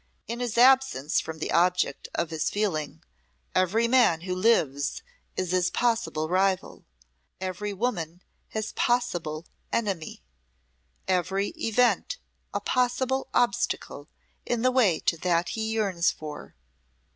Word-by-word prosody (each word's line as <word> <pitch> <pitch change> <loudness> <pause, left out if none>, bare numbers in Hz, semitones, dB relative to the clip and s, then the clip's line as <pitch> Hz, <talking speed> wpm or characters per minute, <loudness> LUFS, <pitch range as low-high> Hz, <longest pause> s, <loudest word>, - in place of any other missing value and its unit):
In 235 +1 -4
his 240 -2 -2
absence 255 - +4
from 160 - -7
the 155 - -3
object 180 -4 +2
of 170 -1 -1
his 160 -1 0
feeling 155 - -2 0.5
every 210 +6 +2
man 235 -10 +4
who 180 +1 -3
lives 175 - +1 0.3
is 185 -1 -1
his 185 -1 +2
possible 230 -10 0
rival, 185 +2 0 0.5
every 190 +2 -3
woman 185 -6 -3 0.2
his 215 0 -4
possible 175 -10 -1 0.3
enemy, 195 - -2 0.8
every 190 +2 +1
event 250 - +1 0.3
a - - -1
possible 260 +1 0
obstacle 240 -11 0 0.3
in 240 -1 -1
the 255 - +4
way 220 -11 +3
to 165 - +1
that 170 0 +1
he 220 -1 -2
yearns 195 -6 +1
for. 150 -1 -8
195 Hz, 120 wpm, -27 LUFS, 170-235 Hz, 0.8 s, absence